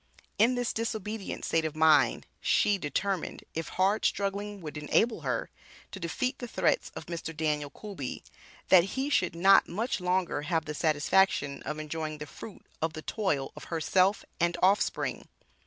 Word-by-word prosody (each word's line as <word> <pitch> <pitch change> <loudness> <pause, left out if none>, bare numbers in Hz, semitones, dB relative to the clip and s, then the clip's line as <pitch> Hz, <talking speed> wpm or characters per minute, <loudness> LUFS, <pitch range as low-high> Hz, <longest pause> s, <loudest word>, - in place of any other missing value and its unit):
In 235 +4 +5
this 245 -1 -1
"disobedient" 220 -2 -4
state 165 - +1
of 160 -1 -3
mind, 155 -1 +4
she 205 -1 +2
determined, 185 +5 -2
if 165 0 -3
hard 195 +3 +1
struggling 200 +1 -1
would 155 -4 -7
enable 220 +10 +1
her, - - -2 0.4
to 195 - -7
defeat 250 - -2
the 245 - -5
threats - - +1
of - - -7
Mr. 165 -2 -6
Daniel 150 -2 0
Coolby, 180 - -7 0.5
that 185 +5 +5
he 275 +2 -1
should 185 -10 +2
not 195 +3 +6
much 215 +6 -1
longer 180 -4 0
have 160 +1 -1
the 150 - -4
satisfaction 150 -1 +2
of 150 - -3
enjoying 155 0 -4
the 150 - -6
fruit 205 +6 -11 0.2
of 160 0 0
the 155 -1 -7
toil 150 -11 -1
of - - -9
herself 185 +4 +2
and 170 0 +1
offspring. 195 +2 +1
180 Hz, 160 wpm, -29 LUFS, 155-205 Hz, 0.5 s, not